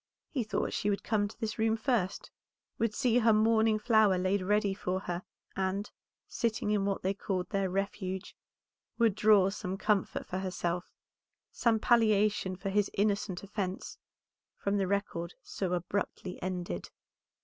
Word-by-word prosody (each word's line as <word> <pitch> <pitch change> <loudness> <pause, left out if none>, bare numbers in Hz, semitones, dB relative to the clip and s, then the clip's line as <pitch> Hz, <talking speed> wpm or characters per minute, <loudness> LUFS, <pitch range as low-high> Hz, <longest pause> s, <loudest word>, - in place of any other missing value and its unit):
He 260 -5 0
thought 215 - -2
she 205 - 0
would 200 - -1
come 205 -2 +1
to 215 - -14
this 220 0 -3
room 220 0 +2
first, 220 -6 -1 0.5
would 225 -2 +1
see 245 -3 +3
her 230 -1 +5
morning 220 0 +4
flower 215 -4 +4
laid 185 +2 +1
ready 205 +1 +2
for 190 -1 -2
her, 175 -2 -3 0.3
and, 195 +2 -1 0.4
sitting 220 -3 -1
in 205 -2 +2
what 200 -1 -1
they 190 +1 +1
called 190 -2 -3
their 195 -2 +1
Refuge, 190 0 -3 0.6
would 230 -3 +4
draw 205 -2 +5
some 195 -2 -4
comfort 205 -1 0
for 185 - -3
herself, 180 -2 -2 0.6
some 230 -2 +2
palliation 215 -4 +3
for 195 +2 -4
his 205 0 +2
innocent 200 -2 0
offence, 195 -2 -4 0.6
from 200 0 0
the 195 -2 +1
record 180 -3 -2
so 185 -2 -3
abruptly 180 +1 -3
ended. 180 - -4
200 Hz, 150 wpm, -31 LUFS, 185-215 Hz, 0.6 s, her